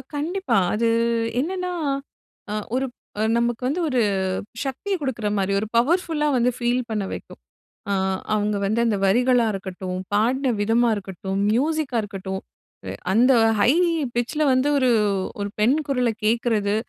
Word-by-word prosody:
கண்டிப்பா. 350 - 0 0.2
அது 230 +2 +1 0.5
என்னன்னா, 365 +5 -2 0.8
அ, - - -2 0.2
ஒரு 265 +1 +1 0.4
அ - - +2
நமக்கு 235 0 0
வந்து 305 +7 -1
ஒரு 255 -5 +1 0.6
சக்திய 275 +9 -3
குடுக்குற 250 -6 -3
மாரி, 195 0 0
ஒரு 210 - -2
பவர்ஃபுல்லா 310 +3 +2
வந்து 245 0 +3
ஃபீல் 245 +1 +1
பண்ண 210 -2 -1
வைக்கும். - - -8 0.5
அ, - - +2 0.4
அவுங்க 210 0 0
வந்து 215 +4 +1
அந்த 215 - +1
வரிகளா 245 +4 +3
இருக்கட்டும், 185 -1 -5 0.2
பாடன 250 +5 +2
விதமா 230 +3 +3
இருக்கட்டும், 190 -1 -5
மியூசிக்கா 280 +2 0
இருக்கட்டும், 190 -2 -5 0.7
அந்த 245 +6 +5 0.3
ஹை 240 - +5 0.4
பிட்ச் 240 +4 -1
ல - - +4
வந்து 260 +2 +2
ஒரு 260 -2 +2 0.5
ஒரு 200 - -2
பெண் 240 +7 +4
குரல 250 -3 +1
கேக்கறது, 220 -2 +1
240 Hz, 140 wpm, -23 LUFS, 210-270 Hz, 0.8 s, அந்த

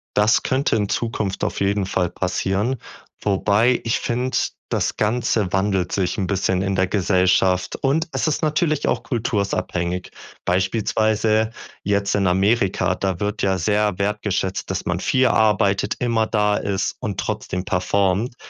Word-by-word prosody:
Das 105 +1 +4
könnte 130 -1 +1
in 105 -2 0
Zukunft 110 -4 -2
auf - - -1
jeden 100 -1 0
Fall 90 -2 0
passieren, 95 +8 -1 0.5
wobei 105 +4 +2
ich 115 - 0
finde, 125 +2 -1 0.3
das - - 0
Ganze 110 -3 0
wandelt 95 -2 +1
sich 95 -2 -1
'n 95 -3 -1
bisschen 95 -1 0
in 95 0 -1
der 95 0 +2
Gesellschaft 95 -1 +2
und 155 +5 0
es - - -1
ist 155 - 0
natürlich 155 -1 +1
auch - - 0
kultursabhängig. 95 - -2 0.3
Beispielsweise 110 +3 +1 0.3
jetzt 100 0 0
in 100 -1 +1
Amerika, 95 -1 +2
da 95 -3 -2
wird 105 +1 -2
ja 95 -1 +2
sehr 105 +2 +1
wertgeschätzt, 100 -2 -1
dass 95 0 -3
man 90 0 -1
viel 130 +5 +2
arbeitet, 105 -3 +2
immer 115 -2 +1
da 105 -2 +2
ist 100 -1 -2
und - - -4
trotzdem 90 +1 -3
performt. 100 +6 0
100 Hz, 145 wpm, -21 LUFS, 95-110 Hz, 0.5 s, Das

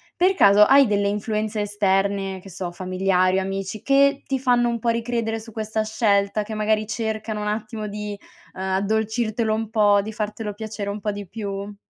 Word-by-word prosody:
per 370 +2 +3
caso 200 - +6
hai 270 +2 +6
delle 200 -1 +1
influenze 215 +1 -2
esterne, 195 -1 0
che 195 - -13
so, 180 0 -5
familiari 185 +1 +1
o - - -1
amici 195 +2 -4
che 280 0 +3
ti 270 -1 -1
fanno 245 -2 +2
un 235 -1 -2
po' 235 - -4
ricredere 230 -1 -1
su 225 0 -12
questa 220 0 -2
scelta, 210 -1 +1
che 215 +1 -7
magari 215 0 0
cercano 220 -1 -3
un 210 - -3
attimo 215 0 -3
di, 210 0 -5 0.4
uhm, 190 - -8
addolcirtelo 220 +3 0
un 220 0 -2
po', 205 -2 +4
di 215 +2 -7
fartelo 210 0 -4
piacere 215 -1 -5
un 205 0 -5
po' 210 - -1
di 205 -2 -7
più? 200 0 -5
210 Hz, 185 wpm, -23 LUFS, 200-220 Hz, 0.4 s, caso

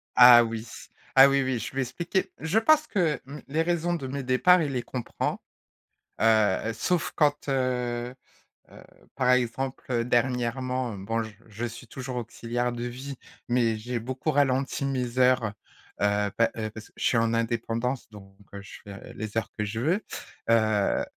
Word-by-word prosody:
Ah 125 -1 +9
oui, 115 0 -5 0.5
ah 135 +1 +10
oui, 140 0 +2
oui, 130 -1 -1
je 115 - -5
lui 135 - -4
ai - - +3
expliqué. 170 +9 -2
Je 165 +7 +1
pense 310 +6 +4
que, 170 - 0
mmh, 140 +3 -9
les 155 +4 0
raisons 175 0 0
de 150 -6 -5
mes 140 +2 -4
départs 135 +8 +4
il 145 - -1
les 125 -2 -2
comprend, 125 -3 -4 0.8
heu, 110 -1 +3
sauf 170 +9 -1
quand, 145 -2 +1
heu 125 -2 -1 0.6
heu, - - -14 0.3
par 125 -1 +2
exemple, 125 +2 -1
heu, 120 -2 +1
dernièrement, 125 0 0
hem, 95 -1 -8
bon 115 +2 -1
j 110 - -10
je 110 +2 -5
suis 120 +1 -7
toujours 130 +1 -6
auxiliaire 120 +1 -3
de 120 0 -4
vie, 130 +3 -6 0.3
mais 120 -2 +2
j'ai 120 +3 -4
beaucoup 130 +6 -3
ralenti 140 -1 +1
mes 130 -2 -2
heures. 125 -4 +3 0.5
Heu, 105 0 +1
pa 115 - +3
heu 110 -1 -3
parce 110 0 -10
que - - -23
je - - -5
suis 120 - +3
en 115 0 +2
indépendance, 115 +2 -2
donc, 95 -2 -14 0.2
heu, 100 - -6
je 100 - -11
fais 100 -1 -10
les 110 +1 -6
heures 115 - -1
que 105 - 0
je 110 +2 -4
veux. 165 - +1 0.5
Heu 110 -3 +2
125 Hz, 180 wpm, -27 LUFS, 115-135 Hz, 0.8 s, ah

